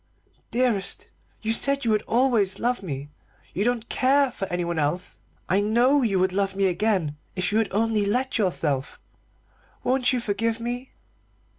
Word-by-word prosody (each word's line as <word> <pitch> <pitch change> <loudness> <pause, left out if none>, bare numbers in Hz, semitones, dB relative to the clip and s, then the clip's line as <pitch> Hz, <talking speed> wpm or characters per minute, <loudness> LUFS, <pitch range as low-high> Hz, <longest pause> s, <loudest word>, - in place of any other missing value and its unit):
Dearest, 235 -5 -1 0.3
you 220 +1 +1
said 275 +3 +2
you 225 - +2
would 210 -1 +2
always 225 -6 +2
love 245 +1 0
me 145 -5 -6 0.4
you 195 - 0
don't 235 -1 0
care 275 +1 +3
for 195 -5 -5
anyone 170 -2 -2
else. 155 +5 -2 0.3
I 190 - +2
know 240 +7 +3
you 210 -6 +1
would 185 0 +1
love 195 0 0
me 195 0 +1
again 185 -5 0 0.2
if 185 -1 -1
you 215 - +3
would 225 - -1
only 215 0 +1
let 250 +4 0
yourself. 150 -9 -1 0.8
Won't 255 0 +2
you 255 - 0
forgive 225 +1 -1
me?" 245 +2 -5
215 Hz, 160 wpm, -25 LUFS, 185-245 Hz, 0.8 s, care